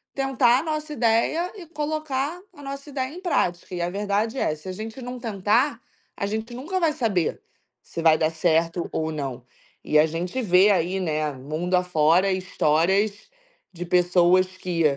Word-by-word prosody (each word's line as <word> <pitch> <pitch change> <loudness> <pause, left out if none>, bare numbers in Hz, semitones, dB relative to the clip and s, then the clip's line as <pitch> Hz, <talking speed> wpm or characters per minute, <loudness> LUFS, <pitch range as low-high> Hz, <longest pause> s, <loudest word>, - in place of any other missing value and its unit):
tentar 265 -2 +3
a - - -4
nossa 305 -1 -3
ideia 240 - +1
e 365 -5 -10
colocar 305 0 -3
a 290 - -13
nossa 275 +1 -7
ideia 265 0 -3
em 360 - -9
prática. 180 - -1
E 175 - -3
a 175 - 0
verdade 205 +5 -1
é 155 - 0
se 155 +4 -14
a - - -2
gente 220 +6 -7
não 250 0 -6
tentar, 225 +4 +1 0.4
a 200 - -2
gente 220 +3 -4
nunca 325 +10 -3
vai 325 -3 +2
saber 200 - -1 0.4
se 165 - -6
vai 160 -1 +5
dar 155 0 +1
certo 165 +1 0
ou 160 0 -2
não. 135 -5 -5 0.4
E 150 - +3
a 155 - +6
gente 175 +9 -3
vê 195 -1 +5
aí, 185 0 +1
né, 155 -4 -1
mundo 155 +7 -2
afora, 180 +1 +3
histórias 190 +3 +1 0.4
de 175 0 -6
pessoas 180 +1 +4
que 175 -2 -1
195 Hz, 170 wpm, -24 LUFS, 170-260 Hz, 0.4 s, a